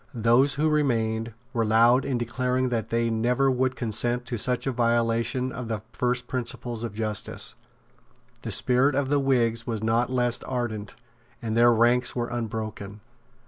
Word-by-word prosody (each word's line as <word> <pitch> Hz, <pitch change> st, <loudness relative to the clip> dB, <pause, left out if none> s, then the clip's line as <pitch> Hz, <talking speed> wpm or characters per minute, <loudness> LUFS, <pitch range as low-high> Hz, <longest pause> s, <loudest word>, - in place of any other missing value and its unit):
Those 120 Hz, +5 st, +3 dB
who 150 Hz, +3 st, +1 dB
remained 115 Hz, -7 st, 0 dB, 0.2 s
were 115 Hz, -, +1 dB
loud 115 Hz, +4 st, +4 dB
in 135 Hz, -3 st, -1 dB
declaring 125 Hz, +2 st, -1 dB
that 115 Hz, -3 st, -2 dB
they 115 Hz, 0 st, 0 dB
never 125 Hz, +4 st, +1 dB
would 130 Hz, 0 st, 0 dB
consent 120 Hz, +1 st, -1 dB
to 120 Hz, -1 st, -4 dB
such 125 Hz, +3 st, 0 dB
a 135 Hz, -, 0 dB
violation 120 Hz, +1 st, 0 dB
of 125 Hz, -1 st, -6 dB
the 110 Hz, -2 st, -4 dB
first 125 Hz, 0 st, 0 dB
principles 120 Hz, -2 st, -4 dB
of 115 Hz, -3 st, -5 dB
justice. 110 Hz, -2 st, -3 dB, 0.9 s
The -, -, -6 dB
spirit 130 Hz, +2 st, +3 dB
of 140 Hz, -1 st, 0 dB
the 145 Hz, 0 st, +2 dB
Whigs 115 Hz, -4 st, +1 dB
was 110 Hz, -3 st, -3 dB
not 115 Hz, +2 st, +1 dB
less 120 Hz, -2 st, +1 dB
ardent, 110 Hz, -5 st, -4 dB, 0.4 s
and 110 Hz, -2 st, -3 dB
their 120 Hz, +1 st, +6 dB
ranks 120 Hz, +2 st, +2 dB
were 120 Hz, -1 st, -2 dB
unbroken. 110 Hz, -3 st, -5 dB
120 Hz, 160 wpm, -25 LUFS, 115-125 Hz, 0.9 s, their